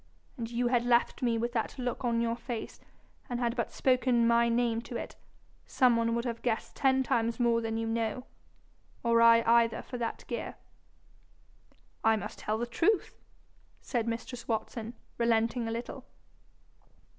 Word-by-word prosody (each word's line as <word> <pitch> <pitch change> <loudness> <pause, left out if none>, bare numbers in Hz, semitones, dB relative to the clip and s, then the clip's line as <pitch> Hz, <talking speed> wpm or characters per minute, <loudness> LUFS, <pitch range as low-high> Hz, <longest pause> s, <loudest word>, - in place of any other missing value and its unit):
An' 235 -4 -4
you 240 +1 0
had 240 -1 +2
left 240 0 +2
me 235 -2 +1
with 235 +1 -1
that 230 +3 -2
look 250 +1 -3
on 235 -1 +1
your 230 0 0
face, 235 -1 -6 0.5
and 245 -1 -2
had 235 -1 0
but 235 -3 -2
spoken 255 -2 +2
my 235 0 +4
name 230 -1 +1
to 240 0 -6
it, - - -7 0.5
some 250 -2 +4
one 230 0 +1
would 235 +1 -2
have 235 -1 -3
guessed 230 -2 -2
ten 265 -1 +3
times 230 -1 0
more 235 -1 +3
than 225 0 -2
you 225 - -2
know 225 +2 -2 0.8
or 230 -1 +4
I 230 0 +7
either 230 0 +3
for 250 - -7
that 230 -1 -4
gear.' - - -5 1.5
'I 225 0 +5
must 210 -1 -6
tell 215 +1 -1
the 235 - -2
truth,' 340 - 0 0.6
said 235 -3 -2
mistress 235 +1 -5
Watson, 225 +1 -3 0.2
relenting 230 0 +1
a - - -2
little. 240 +3 -5
235 Hz, 165 wpm, -30 LUFS, 230-245 Hz, 1.5 s, I